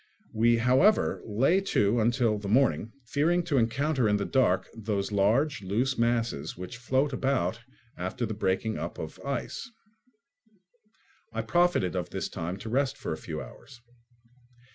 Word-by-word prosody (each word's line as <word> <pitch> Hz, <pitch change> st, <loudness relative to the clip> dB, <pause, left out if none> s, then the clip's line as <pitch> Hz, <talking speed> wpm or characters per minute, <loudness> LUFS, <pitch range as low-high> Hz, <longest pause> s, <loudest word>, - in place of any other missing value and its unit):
We, 115 Hz, +2 st, +4 dB
however, 130 Hz, -, +3 dB
lay 130 Hz, -, +3 dB
to 115 Hz, -, +2 dB
until 115 Hz, -1 st, +2 dB
the 100 Hz, -, -6 dB
morning, 115 Hz, -, +2 dB
fearing 165 Hz, +8 st, +1 dB
to 150 Hz, -6 st, +1 dB
encounter 130 Hz, +1 st, +1 dB
in 105 Hz, -, +3 dB
the 100 Hz, -, -2 dB
dark 130 Hz, -9 st, +2 dB
those 105 Hz, -2 st, -3 dB
large 110 Hz, +7 st, +2 dB
loose 115 Hz, +8 st, 0 dB
masses 115 Hz, -, -1 dB
which 90 Hz, +7 st, -7 dB
float 130 Hz, +3 st, 0 dB
about 125 Hz, -7 st, 0 dB, 0.4 s
after 95 Hz, +7 st, -3 dB
the 110 Hz, -, -4 dB
breaking 105 Hz, 0 st, -1 dB
up 85 Hz, +2 st, -5 dB
of 80 Hz, -, -7 dB
the -, -, -11 dB
ice. 140 Hz, -, -4 dB, 1.6 s
I 115 Hz, 0 st, -3 dB
profited 170 Hz, -, +2 dB
of 90 Hz, -1 st, -2 dB
this 95 Hz, -, -4 dB
time 85 Hz, +1 st, -4 dB
to -, -, -5 dB
rest 135 Hz, +3 st, 0 dB
for -, -, -4 dB
a -, -, -2 dB
few 80 Hz, -1 st, -6 dB
hours. 130 Hz, -3 st, -14 dB
115 Hz, 155 wpm, -28 LUFS, 100-135 Hz, 1.6 s, We